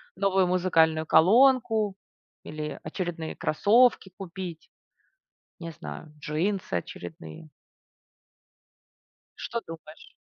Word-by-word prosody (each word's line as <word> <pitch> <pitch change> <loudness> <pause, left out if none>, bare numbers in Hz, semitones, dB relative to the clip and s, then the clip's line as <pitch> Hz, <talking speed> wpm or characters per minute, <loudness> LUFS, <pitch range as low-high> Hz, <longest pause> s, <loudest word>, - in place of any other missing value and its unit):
новую 190 0 +2
музыкальную 165 -3 +2
колонку 225 - +4 0.5
или 150 -1 -6
очередные 165 0 -5
кроссовки 215 +4 +3
купить, 180 -3 -8 0.9
не 170 -1 -7
знаю, 130 - -10
джинсы 180 +7 -2
очередные. 85 - -7 1.9
Что 235 - -4
думаешь? 160 -1 -12
175 Hz, 75 wpm, -27 LUFS, 155-195 Hz, 1.9 s, колонку